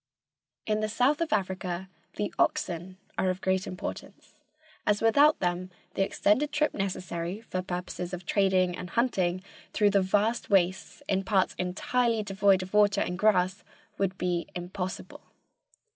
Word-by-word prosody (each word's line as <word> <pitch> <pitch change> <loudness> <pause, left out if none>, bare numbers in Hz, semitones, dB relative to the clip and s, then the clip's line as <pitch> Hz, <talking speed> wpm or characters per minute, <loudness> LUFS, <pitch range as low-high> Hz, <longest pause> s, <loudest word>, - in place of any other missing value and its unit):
In 215 0 0
the 215 0 -1
south 255 +8 +2
of 335 - -1
Africa 190 -2 -2 0.3
the 205 - -2
oxen 180 +2 0 0.2
are 190 - +2
of 185 0 -2
great 190 0 0
importance, 180 - -7 0.5
as 210 0 +2
without 285 +7 +5
them 180 0 -1 0.2
the - - -1
extended 210 +8 +2
trip 300 0 +1
necessary 185 -1 -3
for 185 -5 -4
purposes 180 -1 -5
of 180 -1 -6
trading 185 -2 +2
and 180 - -7
hunting 185 -6 0 0.3
through 205 -1 +3
the 200 -1 +4
vast 210 +5 +1
wastes 190 -2 +1
in 195 0 +1
parts 190 -1 +2
entirely 225 +5 0
devoid 195 -2 +3
of 185 - -10
water 210 -1 +4
and 180 -1 -2
grass 190 -2 +2 0.4
would 190 -1 0
be 175 -1 -1
impossible. 180 +1 -5
190 Hz, 145 wpm, -28 LUFS, 180-210 Hz, 0.5 s, without